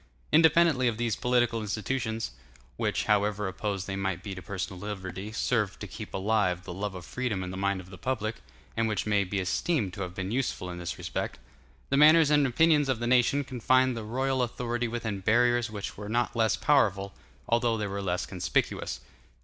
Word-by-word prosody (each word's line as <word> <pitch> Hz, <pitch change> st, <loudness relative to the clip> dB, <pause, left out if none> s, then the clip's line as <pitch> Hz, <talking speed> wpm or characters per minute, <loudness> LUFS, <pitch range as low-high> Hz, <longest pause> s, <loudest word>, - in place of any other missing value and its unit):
Independently 160 Hz, -4 st, +5 dB
of 115 Hz, -2 st, 0 dB
these 115 Hz, -3 st, 0 dB
political 120 Hz, -2 st, +1 dB
institutions—which, 100 Hz, -, -3 dB
however 105 Hz, -1 st, +1 dB
opposed 95 Hz, 0 st, -3 dB
they 95 Hz, -, -4 dB
might 95 Hz, -2 st, -2 dB
be 100 Hz, -, -5 dB
to 90 Hz, -, -7 dB
personal 95 Hz, -2 st, -5 dB
liberty, 95 Hz, 0 st, -6 dB
served 110 Hz, -3 st, 0 dB
to -, -, -5 dB
keep -, -, -8 dB
alive 95 Hz, -3 st, +1 dB
the -, -, -7 dB
love 100 Hz, +1 st, -4 dB
of 90 Hz, -1 st, -8 dB
freedom 120 Hz, -7 st, -2 dB
in 90 Hz, -, -5 dB
the -, -, -6 dB
mind 100 Hz, 0 st, 0 dB
of 95 Hz, 0 st, -11 dB
the 90 Hz, -, -11 dB
public, 115 Hz, -3 st, -2 dB, 0.4 s
and 115 Hz, 0 st, +1 dB
which 105 Hz, -3 st, -1 dB
may 105 Hz, -2 st, +2 dB
be 100 Hz, +2 st, -3 dB
esteemed 95 Hz, -, 0 dB
to 100 Hz, -, -6 dB
have 90 Hz, -1 st, -5 dB
been 95 Hz, +1 st, -3 dB
useful 120 Hz, -7 st, -2 dB
in 90 Hz, -, -7 dB
this 85 Hz, -, -4 dB
respect—the 65 Hz, -, -5 dB
manners 155 Hz, +1 st, +7 dB
and 145 Hz, -2 st, +4 dB
opinions 150 Hz, +2 st, +3 dB
of 130 Hz, -, +2 dB
the 120 Hz, -, -3 dB
nation 125 Hz, +3 st, +3 dB
confined 130 Hz, 0 st, +2 dB
the 115 Hz, -, -5 dB
royal 130 Hz, +4 st, 0 dB
authority 120 Hz, 0 st, -1 dB
within 115 Hz, -3 st, -3 dB
barriers 120 Hz, +3 st, +3 dB
which 105 Hz, -2 st, -6 dB
were 105 Hz, 0 st, -7 dB
not 120 Hz, +2 st, 0 dB
less 115 Hz, -1 st, +3 dB
powerful, 100 Hz, -9 st, +2 dB, 0.3 s
although 115 Hz, -1 st, +2 dB
they 105 Hz, -, -2 dB
were 100 Hz, 0 st, -3 dB
less 90 Hz, -2 st, -1 dB
conspicuous. -, -, -1 dB
110 Hz, 190 wpm, -28 LUFS, 95-125 Hz, 0.4 s, manners